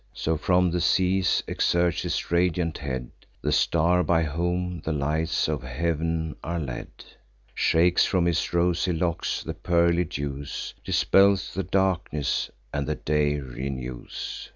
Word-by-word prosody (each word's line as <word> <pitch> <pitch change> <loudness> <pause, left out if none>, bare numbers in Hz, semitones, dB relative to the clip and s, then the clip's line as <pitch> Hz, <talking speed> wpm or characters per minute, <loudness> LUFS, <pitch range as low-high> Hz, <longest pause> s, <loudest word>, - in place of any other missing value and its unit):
So, 80 - -1
from 90 +3 +2
the 90 0 0
seas, 90 +1 +2
exerts 85 -1 +1
his - - -3
radiant 85 -1 +1
head 65 -3 -4 0.3
The - - +1
star 85 +2 +3
by 80 0 +2
whom 90 +2 -2
the 80 - -2
lights 75 +3 0
of 75 -3 -2
heav'n 80 +4 -2
are 85 +1 -2
led; 65 -6 -5 0.6
Shakes 85 +2 +3
from 90 -3 +2
his 85 -1 0
rosy 85 +1 +1
locks 85 0 -1
the - - -4
pearly 85 0 +2
dews, 70 -3 -5
Dispels 100 0 +3
the 95 - -1
darkness, 90 -6 0 0.2
and 70 -2 -2
the - - 0
day 75 -1 +1
renews. 65 -1 -6
85 Hz, 135 wpm, -26 LUFS, 75-90 Hz, 0.6 s, star